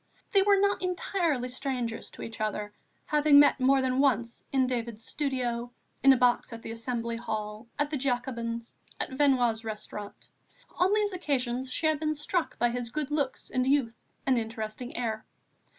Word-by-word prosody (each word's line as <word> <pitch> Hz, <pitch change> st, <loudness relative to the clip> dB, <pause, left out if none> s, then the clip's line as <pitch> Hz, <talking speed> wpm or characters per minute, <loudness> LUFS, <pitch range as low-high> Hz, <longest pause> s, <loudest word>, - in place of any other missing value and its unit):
They 395 Hz, -, +5 dB
were 400 Hz, 0 st, +5 dB
not 400 Hz, 0 st, +2 dB
entirely 350 Hz, -7 st, 0 dB
strangers 250 Hz, -2 st, -3 dB
to -, -, -10 dB
each 225 Hz, -1 st, -7 dB
other, 210 Hz, -1 st, -2 dB, 0.3 s
having 295 Hz, -1 st, +6 dB
met 290 Hz, -2 st, +6 dB
more 265 Hz, +1 st, +4 dB
than 260 Hz, 0 st, +1 dB
once 240 Hz, -4 st, +1 dB
in 265 Hz, -1 st, +3 dB
David's 235 Hz, -3 st, -3 dB
studio, 245 Hz, -4 st, -2 dB, 0.3 s
in 270 Hz, -, +8 dB
a 265 Hz, -, +5 dB
box 245 Hz, +1 st, +2 dB
at 230 Hz, 0 st, -8 dB
the -, -, -5 dB
Assembly 230 Hz, 0 st, -3 dB
Hall, 215 Hz, -1 st, -4 dB
at 290 Hz, +1 st, 0 dB
the 300 Hz, -, 0 dB
Jacobins, 240 Hz, -3 st, -2 dB, 0.2 s
at -, -, -2 dB
Venua's 255 Hz, -5 st, +2 dB
restaurant. 210 Hz, -1 st, -7 dB, 0.5 s
On 365 Hz, +2 st, +4 dB
these 415 Hz, -1 st, +2 dB
occasions 260 Hz, -6 st, -1 dB
she 315 Hz, -, -1 dB
had 310 Hz, -1 st, +3 dB
been 310 Hz, 0 st, 0 dB
struck 315 Hz, +3 st, -2 dB
by 240 Hz, -, +3 dB
his 240 Hz, -1 st, -3 dB
good 295 Hz, +3 st, -3 dB
looks 285 Hz, -3 st, -2 dB
and 255 Hz, 0 st, +1 dB
youth 270 Hz, -4 st, +2 dB, 0.3 s
and 260 Hz, -3 st, +3 dB
interesting 225 Hz, +1 st, -5 dB
air. 220 Hz, -3 st, -2 dB
255 Hz, 170 wpm, -29 LUFS, 230-290 Hz, 0.5 s, in